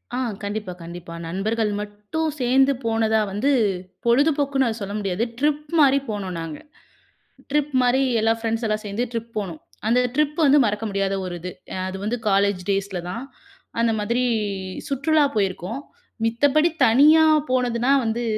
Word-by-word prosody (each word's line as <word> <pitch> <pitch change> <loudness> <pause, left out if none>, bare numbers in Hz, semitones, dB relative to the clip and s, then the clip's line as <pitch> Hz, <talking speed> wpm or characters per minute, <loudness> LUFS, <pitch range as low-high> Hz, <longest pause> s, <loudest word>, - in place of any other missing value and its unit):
ஆ - - -1 0.3
கண்டிப்பா, 205 -2 -4
கண்டிப்பா. 170 0 -9
நண்பர்கள் 210 +5 -1
மட்டும் 210 +10 -3
சேந்து 265 +2 +4
போனதா 225 -1 +2
வந்து, 220 +9 +1 0.5
பொழுதுபோக்குன்னு 275 +1 +2
அத 225 - -1
சொல்ல 200 0 -4
முடியாது, 195 +1 -1 0.2
ட்ரிப் 300 +1 0
மாரி 275 -1 +5
போனோம் 195 -4 -4
நாங்க. 165 -2 -6 0.9
ட்ரிப் 295 0 +1
மாரி 250 +2 +3 0.2
எல்லா 225 +1 +3
ஃப்ரெண்ட்ஸ்லாம் 225 -1 -1
சேந்து 205 +5 -2
ட்ரிப் 230 0 -4
போனோம். 180 -7 -4 0.3
அந்த 240 +3 +4 0.2
ட்ரிப் 300 0 +1
வந்து 285 +1 +6
மறக்க 210 0 -1
முடியாத 195 -1 -1
ஒரு 180 -1 -5
இது. 180 +1 -5 0.2
அ - - -4
அது 190 0 -5
வந்து 225 +4 -1
காலேஜ் 200 -1 +2
டேய்ஸ்ல 195 -2 -1
தான் 230 +7 -5 0.6
அந்த 230 0 +3
மாதிரி 235 +4 0 0.6
சுற்றுலா 295 +3 +2
போயிருக்கோம். 195 +4 -2 0.4
மித்த 230 +5 +1
படி 310 +2 +5 0.2
தனியா 295 +7 +6 0.3
போனதுனா 250 0 +1
வந்து 230 +1 -1
225 Hz, 145 wpm, -23 LUFS, 200-270 Hz, 0.9 s, வந்து